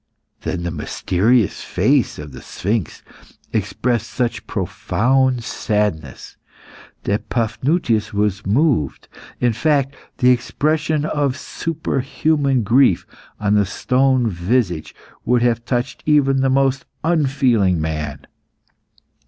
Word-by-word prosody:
Then 85 -2 -3
the 85 - -2
mysterious 95 +7 +1
face - - +1
of 75 -1 -8
the 65 - -10
sphinx 100 -3 -3 0.5
expressed 120 -3 -1
such 120 -2 -2
profound 130 +1 0
sadness 105 -7 -2 0.7
that 100 +1 -2
Paphnutius 120 0 0
was 100 -1 0
moved. 115 - +1 0.3
In 120 -1 +2
fact, 140 +2 +1 0.2
the 125 -1 +5
expression 150 +4 0
of 145 -3 0
superhuman 145 -4 -1
grief 120 -2 +3 0.3
on 105 0 +1
the 105 -1 +4
stone 130 +3 +2
visage 90 -2 -1 0.3
would 120 0 +2
have 120 -1 +1
touched 120 +3 -2
even 140 -3 +4
the 135 - +2
most 135 0 +1 0.2
unfeeling 130 - +2
man. 75 -3 -4
120 Hz, 105 wpm, -20 LUFS, 100-135 Hz, 0.7 s, the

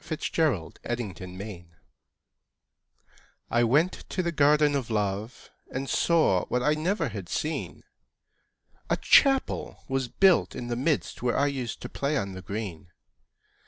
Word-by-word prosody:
THE 155 - -4
GARDEN 120 - -1
OF 85 - -14 0.2
LOVE 100 -2 -7 1.9
I 120 0 +3
went 150 +10 +3 0.2
to 185 - -1
the 170 - -1
Garden 150 -1 +4
of 135 -5 -2
Love, 105 +1 -3 0.2
And 135 +1 -3
saw 155 - +3
what 125 0 -1
I 150 - +3
never 175 +7 0
had - - -7
seen; - - -3 1.1
A - - +2
Chapel 270 -2 +3
was 135 -1 -1
built 190 +7 +3
in 120 - -5
the 120 - -1
midst, 140 +5 -1
Where 125 0 +1
I 140 - +3
used 130 -5 -3
to - - -4
play 140 +2 -1
on 100 -1 -2
the 95 - -7
green. 95 -5 -6
130 Hz, 145 wpm, -27 LUFS, 110-150 Hz, 1.9 s, Garden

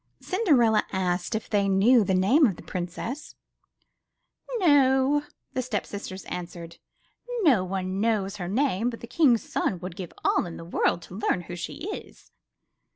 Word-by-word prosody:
Cinderella 265 - +3
asked 185 +2 -1
if 220 - -3
they 200 -1 +1
knew 215 +5 +5
the 190 -1 +1
name 250 - +5
of 195 - -2
the - - -12
princess. 185 - -5 1.2
No," 285 - +4 0.3
the 260 - 0
step 235 -5 -2
sisters 195 -2 -7
answered, 170 -1 -7 0.7
*'no 255 - +5
one 185 +1 -3
knows 210 -3 0
her 175 -3 -4
name, 235 +1 +1
but 230 - -8
the - - -6
King's 240 -2 +3
son 185 - -1
would 180 -1 -6
give 180 -3 -7
all - - +3
the 165 -1 -7
world 170 0 0
to - - -12
learn 185 -4 +1
who 175 0 -8
she 175 - -6
is!" - - -9
205 Hz, 155 wpm, -26 LUFS, 185-255 Hz, 1.2 s, knew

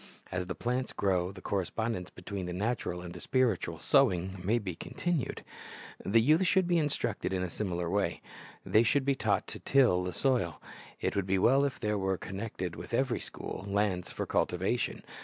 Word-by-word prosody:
As 90 0 -2
the 95 - -3
plants 125 +2 -1
grow, 95 -2 +1
the 95 -1 -12
correspondence 100 0 -2
between 95 0 -6
the 90 - -3
natural 95 -3 -2
and 90 -1 -7
the - - -8
spir 130 -5 +3
itual - - -6
sowing 90 +1 +3
may 110 +6 +2
be 100 -6 -3
continued. 165 - -2 0.6
The 115 +4 +4
youth 155 +8 +4
should 190 -1 +3
be 175 -1 +3
instructed 150 -2 -1
in 95 -1 0
a 90 - -3
similar 90 -4 -2
way. 100 +3 0 0.4
They 110 - +5
should 130 +4 +2
be 140 - +3
taught 135 - +1
to - - -6
till 125 -10 +4
the 90 - -2
soil. 95 - +1 0.4
It - - 0
would 100 -2 0
be 95 0 +2
well 135 +8 +5
if 140 - -3
there 105 -1 0
were, 95 -1 0
connected 95 -3 -5
with - - -4
every 130 -1 +1
school, - - -6
lands 100 -3 0
for - - -3
cultivation. 95 +7 0
100 Hz, 190 wpm, -31 LUFS, 90-125 Hz, 0.6 s, They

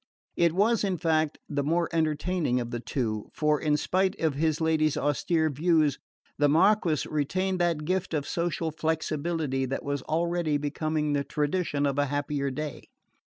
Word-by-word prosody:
It 170 -2 +3
was, 215 +5 +2
in 190 -3 0
fact, 160 -2 +1
the 145 -1 -1
more 165 +4 +1
entertaining 155 -3 0
of 120 -1 -4
the 120 - -3
two; 110 -4 -3
for, 150 -1 +1
in 150 -1 +2
spite 190 +5 0
of 160 -3 +1
his 155 +2 0
lady's 155 -2 +2
austere 160 +2 +1
views, 155 -1 +2 0.4
the 145 0 +4
Marquis 170 -1 +3
retained 185 +6 -1
that 170 -3 0
gift 185 -1 -1
of 145 -2 -2
social 170 -1 -1
flexibility 155 -3 -1
that 135 - -3
was 140 -1 -2
already 170 0 0
becoming 150 +1 -1
the 140 -1 +1
tradition 150 0 -1
of 140 0 0
a 145 - +2
happier 145 0 -1
day. 150 0 -5
155 Hz, 160 wpm, -27 LUFS, 145-170 Hz, 0.4 s, the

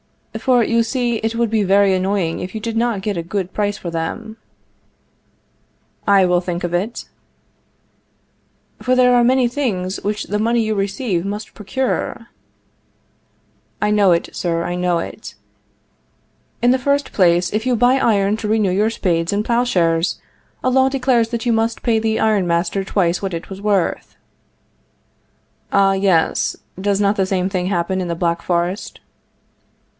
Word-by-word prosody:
For, 250 -3 +3
you 230 +1 +2
see, 235 0 -1
it 225 +1 -2
would 230 -1 0
be 220 -1 +2
very 200 0 +3
annoying 185 -2 0
if 185 +4 -6
you 220 - -4
did 230 +1 -4
not 230 -3 0
get 200 -1 -2
a - - -1
good 185 +2 -4
price 205 0 -1
for 175 - -6
them. 220 +7 -4 1.7
I 195 -2 +5
will 180 -1 +2
think 175 -1 -4
of 175 0 -3
it. 200 +7 -2 1.8
For 255 - +1
there 250 -1 +5
are 245 -1 +4
many 255 0 +3
things 205 -8 -2
which 210 +1 -2
the 210 +1 -3
money 230 +2 +2
you 220 0 -1
receive 195 -2 -1
must 205 +2 -5
procure. 235 +1 -3 1.5
I 210 - +1
know 205 -3 +4
it, 170 - -1
sir. 170 -1 -1
I 175 - -3
know 180 -1 0
it. 165 - -7 1.3
In 245 - +5
the 260 - +2
first 280 +2 0
place, 175 -1 +2
if 220 +4 -1
you 250 - +2
buy 245 +3 +4
iron 210 -5 +2
to 220 - -4
renew 210 -3 +2
your 210 +4 +2
spades 170 -6 -1
and 205 +1 -1
plowshares, 180 -9 +1 0.4
a 255 - +2
law 265 +1 +4
declares 255 -4 +1
that 235 0 -4
you 240 - +2
must 225 +1 -1
pay 225 -2 +2
the 220 0 0
iron 210 -4 +2
master 170 +3 0
twice 180 -3 0
what 190 -3 -3
it 165 - -8
was 195 0 -7
worth. 200 -4 -1 1.6
Ah, 195 -1 +4
yes; 190 -4 +1 0.2
does 200 0 0
not 205 0 +2
the 190 - +2
same 190 -1 0
thing 185 -2 -2
happen 185 0 -1
in 180 - -3
the 170 - -2
Black 170 0 -1
Forest? 175 +3 -2
205 Hz, 165 wpm, -19 LUFS, 180-230 Hz, 1.8 s, I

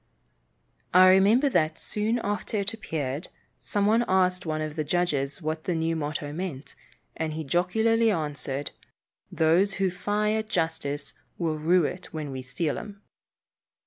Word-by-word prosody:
I 185 0 +9
remember 205 +9 +5
that, 160 -8 +1
soon 215 +3 -1
after 205 +1 -2
it 200 +2 -1
appeared, 155 -8 -4 0.3
some 205 -1 0
one 225 +3 +4
asked 180 -1 +2
one 155 0 -1
of 155 -1 -5
the 155 - -1
judges 150 -2 -1
what 155 +1 -3
the 180 - 0
new 165 0 0
motto 145 -1 -3
meant, 155 -5 -5 0.4
and 160 -1 -2
he 160 +1 -4
jocularly 220 +9 +2
answered, 145 -6 -2 0.6
"Those 170 +5 +3
who 190 -1 +1
fy 210 +3 0
at 220 0 -2
justice 160 -6 -2 0.2
will 160 -3 -1
rue 170 +2 +3
it 180 +5 -5
when 155 -3 -5
we 130 -1 -5
seal 135 +5 -2
'em." 205 -1 -10
170 Hz, 150 wpm, -27 LUFS, 155-200 Hz, 0.6 s, I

